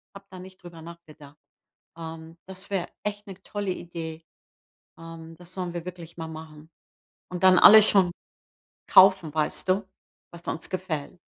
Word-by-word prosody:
habe 195 Hz, 0 st, -12 dB
da 185 Hz, -, -10 dB
nicht 185 Hz, 0 st, -14 dB
drüber 170 Hz, -2 st, -11 dB
nachgedacht. 155 Hz, -3 st, -14 dB, 0.6 s
Ähm, 165 Hz, 0 st, -9 dB
das 190 Hz, +1 st, -8 dB
wäre 195 Hz, -3 st, -2 dB, 0.2 s
echt 205 Hz, 0 st, -5 dB
'ne 195 Hz, -1 st, -11 dB
tolle 205 Hz, -2 st, -4 dB
Idee. 165 Hz, -2 st, -7 dB, 0.7 s
Ähm, 165 Hz, 0 st, -11 dB
das 175 Hz, +1 st, -13 dB
sollen 180 Hz, -2 st, -5 dB
wir 170 Hz, -, -5 dB
wirklich 170 Hz, -2 st, -10 dB
mal 165 Hz, -1 st, -6 dB
machen. 155 Hz, -1 st, -11 dB, 0.6 s
Und 180 Hz, -1 st, -6 dB
dann 185 Hz, -1 st, +7 dB
alles 215 Hz, +2 st, +9 dB
schon 185 Hz, -3 st, +3 dB, 0.8 s
kaufen, 190 Hz, -5 st, +5 dB
weißt 155 Hz, +3 st, -2 dB
du, 190 Hz, +2 st, +2 dB, 0.5 s
was 170 Hz, 0 st, -12 dB
uns 160 Hz, -, -4 dB
gefällt. 180 Hz, -4 st, -5 dB
175 Hz, 155 wpm, -26 LUFS, 160-185 Hz, 0.8 s, alles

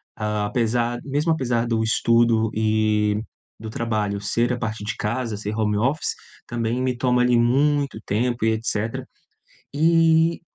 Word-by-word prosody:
Apesar, 115 Hz, +3 st, -1 dB
mesmo 145 Hz, +4 st, 0 dB
apesar 120 Hz, -6 st, 0 dB
do 115 Hz, -1 st, 0 dB
estudo 115 Hz, 0 st, +2 dB
e 110 Hz, -1 st, +1 dB, 0.4 s
do 110 Hz, -, -7 dB
trabalho 105 Hz, -3 st, -2 dB
ser 115 Hz, +4 st, 0 dB
a -, -, -2 dB
partir 110 Hz, -2 st, -4 dB
de 110 Hz, -, -3 dB
casa, 115 Hz, 0 st, -2 dB
ser 105 Hz, +1 st, -4 dB
home 105 Hz, -1 st, +1 dB
office, 135 Hz, +8 st, 0 dB, 0.3 s
também 120 Hz, +1 st, -2 dB
me 130 Hz, -1 st, 0 dB
toma, 125 Hz, 0 st, +2 dB
ali, 125 Hz, 0 st, +3 dB
muito 140 Hz, +2 st, +2 dB
tempo 120 Hz, +2 st, 0 dB
e 110 Hz, -, +3 dB
etcétera. 110 Hz, 0 st, -2 dB, 0.7 s
E, 165 Hz, +1 st, +3 dB
115 Hz, 140 wpm, -23 LUFS, 110-125 Hz, 0.7 s, ali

